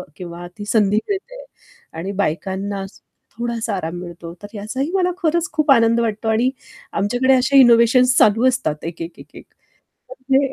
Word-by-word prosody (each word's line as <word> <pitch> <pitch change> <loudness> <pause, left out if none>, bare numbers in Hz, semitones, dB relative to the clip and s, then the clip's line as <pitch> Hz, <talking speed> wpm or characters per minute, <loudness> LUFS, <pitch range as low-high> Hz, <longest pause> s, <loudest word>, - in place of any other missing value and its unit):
किंवा 175 -1 -8
ती 205 - -7
संधी 210 -1 +2
मिळते - - -5 0.5
आणि 180 +4 -4
बायकांना 195 +4 -3
अस 195 - -12 0.4
थोडासा 235 -2 -2
आराम 170 -2 -4
मिळतो. 170 -1 -9
तर - - -6
याचाही 260 +9 -4
मला 360 -2 +2
खरंच 340 0 0
खूप 305 -2 +2
आनंद 230 -2 +4
वाटतो. 225 -1 -2
आणि 230 +3 +2 0.5
आमच्याकडे 245 +6 +2
अशा 260 +2 +3
इनोव्हेशन्स 250 +1 +5
चालू 225 +4 +4
असतात. 195 - -2
एक, 165 0 -6
एक, 165 +1 -7
एक, - - -15
एक - - -12 0.7
तर - - -8 0.2
ते 270 0 +3
230 Hz, 165 wpm, -20 LUFS, 195-260 Hz, 0.7 s, इनोव्हेशन्स